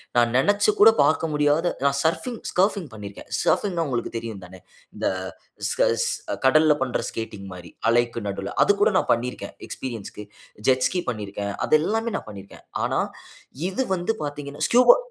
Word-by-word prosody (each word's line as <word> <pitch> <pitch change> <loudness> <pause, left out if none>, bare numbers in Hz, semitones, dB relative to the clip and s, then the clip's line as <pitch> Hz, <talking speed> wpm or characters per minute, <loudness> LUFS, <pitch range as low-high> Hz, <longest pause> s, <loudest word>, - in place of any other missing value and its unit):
நான் 120 -1 +4
நெனைச்சு 205 +8 +3
கூட 220 +2 +9
பாக்க 160 - +2
முடியாத 150 +3 +2 0.2
நான் 140 0 +2
சர்ஃபிங் 220 +9 -1
ஸ்கர்ஃபிங் 190 -2 +1
பண்ணியிருக்கேன். 100 -2 -9
சர்ஃபிங்ன்னா 180 -5 +1
உங்களுக்கு 120 -3 -2
தெரியும் 110 -4 -6
தானே. 95 +1 -13 0.4
இந்த - - -1 0.6
ஸ்கேட் - - +2 0.4
கடல்ல 155 +2 +5
பண்ற 130 -2 -1
ஸ்கேட்டிங் 105 -3 -6
மாரி 90 -1 -10 0.2
அலைக்கு 120 0 +1
நடுல 100 0 -4
அது - - +5
கூட 205 - +4
நான் - - -1
பண்ணியிருக்கேன். 125 +2 -3
எக்ஸ்பீரியன்ஸ்க்கு. 110 -4 -6 0.4
ஜெட் 130 -1 +4
ஸ்கி 180 -1 -2
பண்ணியிருக்கேன். 100 -2 -4
அது 155 - +5
எல்லாமே 225 +5 -1
நான் - - -7
பண்ணிருக்கேன். 100 -1 -12 0.2
ஆனா - - +1 0.7
இது 260 +8 -1
வந்து 180 +5 -1
பாத்தீங்கன்னா 145 0 -4
ஸ்கூபா 250 - +7
135 Hz, 150 wpm, -24 LUFS, 110-180 Hz, 0.7 s, கூட